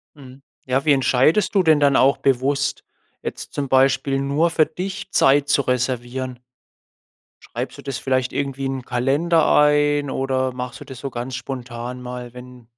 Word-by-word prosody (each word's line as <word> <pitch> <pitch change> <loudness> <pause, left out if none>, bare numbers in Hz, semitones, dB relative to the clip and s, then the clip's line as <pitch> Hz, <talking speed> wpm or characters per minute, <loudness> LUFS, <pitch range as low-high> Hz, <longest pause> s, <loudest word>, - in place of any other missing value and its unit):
Mhm. 135 -1 -14 0.2
Ja, 130 +2 0
wie 150 - +4
entscheidest 140 - +2
du 195 - +4
denn 155 -3 +4
dann 140 -1 +4
auch 135 +2 +4
bewusst, 135 +2 0 0.4
jetzt - - -6
zum 140 -2 -2
Beispiel 135 +1 +2
nur 145 +5 +1
für 160 -2 +3
dich 180 +4 -6
Zeit 140 +1 +4
zu 140 - +3
reservieren? 125 0 -2 1.2
Schreibst - - -4
du - - -9
das 135 -1 -4
vielleicht 130 -1 -1
irgendwie 135 -1 -3
in 135 - -2
'n 125 - -10
Kalender 140 +7 +1
ein, 145 -1 +3
oder 130 -1 -1
machst 125 0 -6
du - - -9
das 130 -3 -10
so 140 - -5
ganz 125 +1 -5
spontan 125 -1 -6
mal, 125 -1 -7
wenn 125 -1 -13
135 Hz, 170 wpm, -21 LUFS, 125-145 Hz, 1.2 s, wie